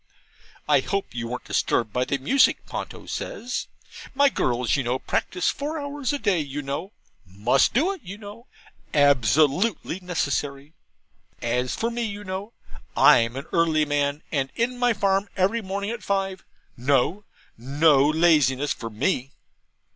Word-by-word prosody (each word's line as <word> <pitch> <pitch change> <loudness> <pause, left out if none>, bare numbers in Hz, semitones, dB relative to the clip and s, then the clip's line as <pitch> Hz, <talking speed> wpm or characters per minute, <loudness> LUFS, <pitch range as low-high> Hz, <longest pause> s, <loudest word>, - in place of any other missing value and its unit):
'I - - +5
hope 200 -1 -3
you 120 -1 -4
weren't 125 +1 -5
disturbed 110 -3 0
by 125 0 +1
the 140 - -1
music?' 255 - +3
Ponto - - -7
says. 245 +1 -4 0.5
'My 280 +1 +5
girls, 125 - 0
you 140 - +1
know, 125 +1 -1
practise 180 +6 -1
four 300 +3 -4
hours 285 -1 -3
a 290 - -1
day, 200 -9 +1
you 145 -1 -4
know 150 +9 -5 0.3
must 105 - +1
do 320 +10 +3
it, 385 -5 -7
you 200 -2 -8
know 210 +3 -11 0.5
absolutely 145 - +3
necessary. 145 -5 -3 0.7
As 125 +1 -1
for 230 +1 -1
me, 235 0 -3
you 205 -2 -4
know 195 +3 -6 0.4
I'm 115 +1 +5
an 135 +2 -5
early 160 -2 +3
man, 145 0 -1
and 135 -3 -1
in 245 +2 -1
my 245 -1 +3
farm 195 -1 +1
every 195 +5 +2
morning 200 +1 -3
at 235 -2 -5
five 195 -2 -2 0.3
no, 140 - +1 0.3
no 140 +3 +3
laziness 150 -4 +3
for 115 - -7
ME.' 120 +4 -1
160 Hz, 150 wpm, -24 LUFS, 135-205 Hz, 0.7 s, I